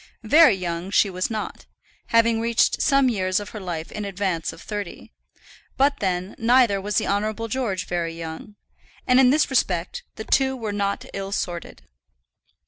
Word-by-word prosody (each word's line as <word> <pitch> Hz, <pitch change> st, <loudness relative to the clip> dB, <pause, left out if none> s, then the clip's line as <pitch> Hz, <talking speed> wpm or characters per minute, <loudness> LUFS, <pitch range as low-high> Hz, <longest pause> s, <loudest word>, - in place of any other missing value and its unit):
Very 295 Hz, +1 st, +6 dB
young 175 Hz, -1 st, -4 dB
she 200 Hz, 0 st, +3 dB
was 185 Hz, 0 st, -2 dB
not, 220 Hz, -2 st, -5 dB, 0.4 s
having 230 Hz, 0 st, +3 dB
reached 230 Hz, 0 st, +2 dB
some 275 Hz, -2 st, +4 dB
years 185 Hz, -5 st, 0 dB
of 205 Hz, 0 st, -7 dB
her 220 Hz, -, -8 dB
life 170 Hz, -4 st, -5 dB
in 210 Hz, -, -5 dB
advance 190 Hz, -4 st, -2 dB
of -, -, -13 dB
thirty; 205 Hz, -4 st, -7 dB, 0.7 s
but 280 Hz, +1 st, +2 dB
then, 185 Hz, 0 st, -2 dB
neither 230 Hz, -4 st, +4 dB
was 205 Hz, +2 st, -2 dB
the -, -, +1 dB
Honourable 215 Hz, +3 st, -1 dB
George 220 Hz, -6 st, -2 dB
very 170 Hz, -2 st, -3 dB
young; 165 Hz, +5 st, -8 dB, 0.5 s
and 250 Hz, +1 st, +4 dB
in 260 Hz, -1 st, +6 dB
this 295 Hz, +1 st, +2 dB
respect 180 Hz, -9 st, 0 dB
the 220 Hz, -, -6 dB
two 265 Hz, -1 st, +2 dB
were 220 Hz, -4 st, -4 dB
not 200 Hz, -1 st, -2 dB
ill 195 Hz, 0 st, -5 dB
sorted. 175 Hz, -4 st, -4 dB
205 Hz, 165 wpm, -23 LUFS, 185-230 Hz, 0.7 s, Very